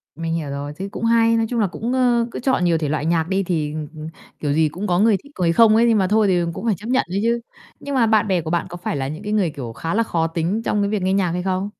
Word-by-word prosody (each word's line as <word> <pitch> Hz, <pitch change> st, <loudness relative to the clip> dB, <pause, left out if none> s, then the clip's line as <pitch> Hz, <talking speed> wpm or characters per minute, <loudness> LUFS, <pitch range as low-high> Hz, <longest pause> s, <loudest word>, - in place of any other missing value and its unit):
Mình 165 Hz, +1 st, -3 dB
hiểu 160 Hz, -3 st, -3 dB
rồi, 140 Hz, +1 st, -5 dB
thế 195 Hz, -, -4 dB
cũng 230 Hz, -, -4 dB
hay. 230 Hz, 0 st, +4 dB
Nói 225 Hz, -, +1 dB
chung 240 Hz, -, -1 dB
là 210 Hz, -, +2 dB
cũng, 230 Hz, +7 st, -4 dB
ơ, 245 Hz, -2 st, +2 dB
cứ -, -, -5 dB
chọn 255 Hz, -7 st, +1 dB
nhiều 170 Hz, -2 st, +3 dB
thể 155 Hz, -2 st, -2 dB
loại 150 Hz, 0 st, -1 dB
nhạc 165 Hz, -1 st, +1 dB
đi 195 Hz, 0 st, +1 dB
thì, 155 Hz, -5 st, -2 dB
ừm, 155 Hz, -1 st, -5 dB
ừm, 155 Hz, 0 st, -7 dB, 0.3 s
kiểu 145 Hz, -2 st, -1 dB
gì 155 Hz, 0 st, +2 dB
cũng 185 Hz, +7 st, -5 dB
có 175 Hz, -1 st, +2 dB
người 215 Hz, -1 st, +4 dB
thích 285 Hz, -, -17 dB
người 170 Hz, -2 st, +2 dB
không 220 Hz, +3 st, +6 dB
ấy, 230 Hz, +1 st, +4 dB
nhưng 225 Hz, -, +4 dB
mà 190 Hz, -2 st, +2 dB
thôi 215 Hz, +1 st, +3 dB
thì 180 Hz, -2 st, +2 dB
cũng 220 Hz, -, -6 dB
phải 220 Hz, -3 st, +2 dB
chấp 210 Hz, +6 st, -9 dB
nhận 255 Hz, +1 st, +2 dB
ấy 190 Hz, +3 st, -1 dB
chứ. 235 Hz, +1 st, +1 dB, 0.4 s
Nhưng 285 Hz, -1 st, -5 dB
mà 245 Hz, -3 st, +4 dB
bạn 220 Hz, -1 st, +3 dB
bè 185 Hz, -3 st, +1 dB
của 160 Hz, -, -6 dB
bạn 170 Hz, +1 st, 0 dB
có 175 Hz, -, -7 dB
phải 175 Hz, -, -3 dB
là 135 Hz, -1 st, -2 dB
những 155 Hz, +3 st, -7 dB
cái 210 Hz, -, -3 dB
người, 200 Hz, -5 st, +2 dB
kiểu, 135 Hz, -7 st, -7 dB
khá 165 Hz, +8 st, -4 dB
là 230 Hz, +2 st, +2 dB
khó 165 Hz, -7 st, -1 dB
tính 170 Hz, +6 st, -2 dB
trong 210 Hz, -, +1 dB
cái 200 Hz, -, 0 dB
việc 210 Hz, -2 st, -1 dB
nghe 185 Hz, +1 st, +1 dB
nhạc 190 Hz, -3 st, +1 dB
hay 180 Hz, +1 st, -2 dB
không? 190 Hz, +1 st, -1 dB
185 Hz, 325 wpm, -21 LUFS, 165-220 Hz, 0.4 s, không